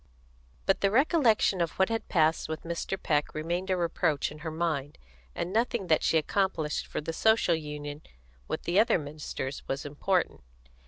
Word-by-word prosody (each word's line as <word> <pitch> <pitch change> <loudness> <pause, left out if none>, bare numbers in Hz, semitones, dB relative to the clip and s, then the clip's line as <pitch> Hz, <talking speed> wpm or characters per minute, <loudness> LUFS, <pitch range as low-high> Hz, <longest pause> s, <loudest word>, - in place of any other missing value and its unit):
But 195 - +2
the 195 - +4
recollection 235 - +3
of 170 -1 0
what 190 +2 +3
had 225 0 -3
passed 160 -2 +2
with 160 0 -4
Mr. 170 +3 -3
Peck 150 -1 0
remained 175 +5 -2
a 185 - +2
reproach 165 -3 0
in 150 - -10
her 160 +1 -4
mind, 155 -3 -2 0.4
and 180 - -3
nothing 230 -2 +1
that 155 - +4
she 165 - +3
accomplished 160 -2 0
for - - -4
the 165 +2 -4
Social 220 -2 +3
Union 150 -1 -5 0.5
with - - -3
the 175 +4 +2
other 220 - +4
ministers 145 -2 -5
was 135 +2 -3
important. 175 +6 0
165 Hz, 170 wpm, -29 LUFS, 150-195 Hz, 0.5 s, the